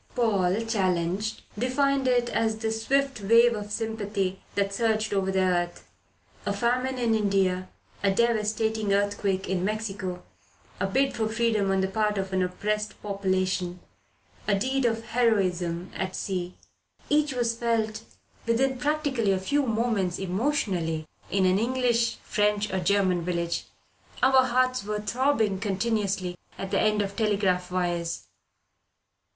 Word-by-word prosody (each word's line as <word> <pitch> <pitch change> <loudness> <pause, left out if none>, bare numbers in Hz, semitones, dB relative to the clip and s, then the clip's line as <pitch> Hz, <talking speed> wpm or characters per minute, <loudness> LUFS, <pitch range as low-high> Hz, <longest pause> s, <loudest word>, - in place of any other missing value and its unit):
Paul, 200 -5 +2
challenged, 190 -1 0 0.2
defined 270 +2 +1
it 245 -1 +3
as 220 -2 0
the 220 0 -2
swift 270 +3 0
wave 230 +4 +5
of 210 -1 -5
sympathy 205 -4 -2
that 200 0 0
surged 220 0 +1
over 190 -1 +1
the 190 0 +2
earth. 175 -1 -1 0.6
A - - -1
famine 250 +5 0
in 235 -2 +1
India, 195 -3 +1 0.3
a 200 - +3
devastating 220 -1 +1
earthquake 200 -1 0
in 185 -1 -1
Mexico, 195 -3 -3 0.6
a 195 - +1
bid 270 +7 +1
for 220 -2 0
freedom 220 -3 +1
on 195 0 +2
the 190 - +1
part 210 +1 0
of 190 0 -3
an 185 - +2
oppressed 210 +3 -2
population, 185 -3 -1 0.7
a 205 - +3
deed 260 +4 0
of 225 -1 0
heroism 185 -7 +1
at 190 0 -3
sea 180 -2 -3 0.6
each 295 -2 +2
was 235 -2 +1
felt 225 -2 0 0.5
within 260 +3 +1
practically 285 -6 +1
a 190 - +2
few 285 +11 +1
moments, 220 -6 0
emotionally, 185 - -1 0.2
in 195 -1 +2
an 185 +1 +3
English, 235 -1 +1
French 210 -1 0
or 190 - +1
German 185 -1 +2
village. 170 -1 -2 0.6
Our 260 0 +6
hearts 255 -1 +1
were 210 +1 -2
throbbing 225 -3 +1
continuously 200 -3 -1 0.2
at 195 - -5
the - - +2
end 210 -1 +2
of 200 0 -5
telegraph 200 -5 +1
wires. 175 -2 -1
210 Hz, 140 wpm, -27 LUFS, 190-230 Hz, 0.7 s, Our